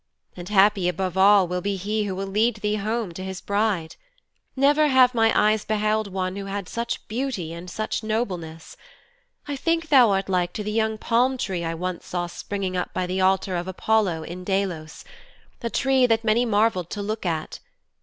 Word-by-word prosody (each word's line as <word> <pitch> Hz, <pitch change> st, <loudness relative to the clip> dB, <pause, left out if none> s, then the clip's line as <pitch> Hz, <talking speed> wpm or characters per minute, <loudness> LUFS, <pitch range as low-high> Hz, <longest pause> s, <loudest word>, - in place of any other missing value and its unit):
And 175 Hz, +1 st, -8 dB
happy 200 Hz, -2 st, +4 dB
above 185 Hz, +1 st, -3 dB
all 195 Hz, 0 st, +6 dB
will 180 Hz, +1 st, -2 dB
he 200 Hz, +2 st, -1 dB
be 210 Hz, +3 st, -1 dB
who 190 Hz, -, -3 dB
will 195 Hz, +1 st, -3 dB
lead 215 Hz, +4 st, +1 dB
thee 210 Hz, -1 st, -2 dB
to 210 Hz, -, 0 dB
his 200 Hz, -, -5 dB
home 220 Hz, -2 st, -2 dB
as 165 Hz, -, -10 dB
his 190 Hz, 0 st, -5 dB
bride. 200 Hz, -5 st, -1 dB, 0.6 s
Never 290 Hz, +3 st, +4 dB
have 260 Hz, -2 st, +5 dB
my 225 Hz, -1 st, +3 dB
eyes 215 Hz, 0 st, +3 dB
beheld 215 Hz, -1 st, 0 dB
one 185 Hz, 0 st, -2 dB
who 200 Hz, 0 st, -5 dB
had 195 Hz, -1 st, -4 dB
such 235 Hz, +1 st, -4 dB
beauty 220 Hz, -9 st, -3 dB
and 170 Hz, +2 st, -8 dB
such 215 Hz, +4 st, -3 dB
nobleness. 185 Hz, -8 st, -4 dB, 0.7 s
I 290 Hz, -, -3 dB
think 330 Hz, +3 st, -1 dB
thou 255 Hz, -6 st, +7 dB
art 195 Hz, -1 st, 0 dB
like 180 Hz, -2 st, 0 dB
to 210 Hz, -, -4 dB
the 210 Hz, -, -3 dB
young 220 Hz, 0 st, 0 dB
palm 250 Hz, +4 st, +1 dB
tree 185 Hz, -7 st, -3 dB
I 165 Hz, 0 st, -2 dB
once 180 Hz, +1 st, -5 dB
saw 175 Hz, -1 st, -2 dB
springing 190 Hz, +1 st, -4 dB
up 180 Hz, -, -3 dB
by 185 Hz, -, 0 dB
the 185 Hz, +1 st, -2 dB
altar 190 Hz, 0 st, +2 dB
of 175 Hz, +1 st, -3 dB
Apollo 190 Hz, -3 st, 0 dB
in 180 Hz, +3 st, -8 dB
Delos 185 Hz, -5 st, -3 dB, 0.6 s
a 235 Hz, -, -2 dB
tree 265 Hz, 0 st, +2 dB
that 225 Hz, -1 st, +1 dB
many 225 Hz, +2 st, +2 dB
marvelled 210 Hz, -5 st, +1 dB
to 205 Hz, -, -4 dB
look 215 Hz, +2 st, -3 dB
at. 165 Hz, -4 st, -3 dB
200 Hz, 200 wpm, -24 LUFS, 185-225 Hz, 0.7 s, thou